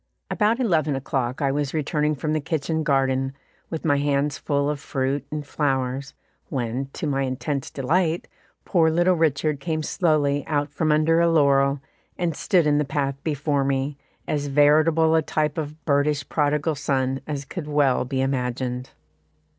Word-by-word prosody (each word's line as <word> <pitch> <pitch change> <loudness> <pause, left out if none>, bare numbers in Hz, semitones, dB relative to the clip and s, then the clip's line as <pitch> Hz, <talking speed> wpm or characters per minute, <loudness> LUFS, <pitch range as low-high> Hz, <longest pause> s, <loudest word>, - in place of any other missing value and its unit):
About 220 +3 +2
eleven 160 - +1
o'clock 135 0 -2
I 135 - +2
was 145 +1 -2
returning 150 0 0
from 155 +2 -2
the 155 - +1
kitchen 160 +1 -1
garden, 135 -2 +1 0.4
with 160 -1 -5
my 145 -3 +3
hands 140 0 0
full 140 -1 0
of 150 -1 -2
fruit 135 0 -2
and 150 -1 -4
flowers, 135 -2 -2 0.3
when, 125 +1 -2
to - - -4
my 135 -2 0
intense 135 +1 -2
delight, 165 +5 0 0.4
poor 165 -3 +3
little 175 +3 +3
Richard 155 -3 +1
came 155 +1 -2
slowly 145 -4 +1
out 145 -1 -1
from 155 -1 +1
under 155 +2 +3
a 170 0 +4
laurel, 140 -3 +3 0.4
and 170 -3 -1
stood 175 0 +2
in 145 -1 +3
the - - +2
path 140 -1 -2
before 145 -2 0
me, 135 +1 -1 0.3
as 145 -1 -1
veritable 155 +3 +4
a 160 - +4
type 150 -1 -1
of 150 -1 -4
a - - -21
birdish 145 -1 +1
prodigal 150 +1 +1
son 135 -2 -1
as 145 -2 -4
could 165 -1 -6
well 145 -4 +2
be 130 +1 -2
imagined. 125 -1 -2
145 Hz, 165 wpm, -24 LUFS, 135-155 Hz, 0.4 s, a